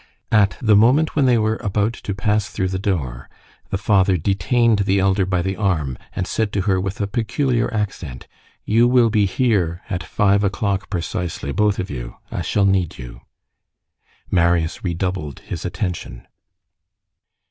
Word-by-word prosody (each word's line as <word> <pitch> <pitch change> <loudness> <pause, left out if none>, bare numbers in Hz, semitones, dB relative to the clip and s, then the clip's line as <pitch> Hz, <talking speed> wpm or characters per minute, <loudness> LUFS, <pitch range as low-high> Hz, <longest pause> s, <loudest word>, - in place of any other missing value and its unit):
At 105 -3 +3
the 110 -3 +4
moment 130 +9 +4
when 140 -3 +3
they 125 -2 +4
were 110 0 +1
about 105 +2 0
to 100 -3 -5
pass 105 +1 0
through 95 - -2
the 95 0 -2
door, 75 - -3 0.4
the 95 - -1
father 95 -2 +3
detained 105 +6 +2
the 100 -1 +2
elder 95 0 +2
by 90 -2 0
the 95 +1 -2
arm, 80 - 0 0.2
and 95 - -1
said 110 +1 -1
to 100 - +1
her 95 -1 +1
with 95 +1 -4
a 100 - 0
peculiar 120 +4 0
accent:— 95 - -4 0.4
"You 115 +3 +4
will 120 -2 +4
be 105 -2 +3
here 95 -6 0
at 90 -2 -1
five 100 +5 +2
o'clock 100 0 -1
precisely. 85 -5 -3
Both 105 +4 +1
of 95 - -4
you. - - -6 0.2
I - - -3
shall 100 - +1
need 95 -4 +1
you." - - -10 1.1
Marius 85 -2 +1
redoubled 90 -4 -3
his - - -6
attention. 90 -10 -4
100 Hz, 160 wpm, -21 LUFS, 90-105 Hz, 1.1 s, the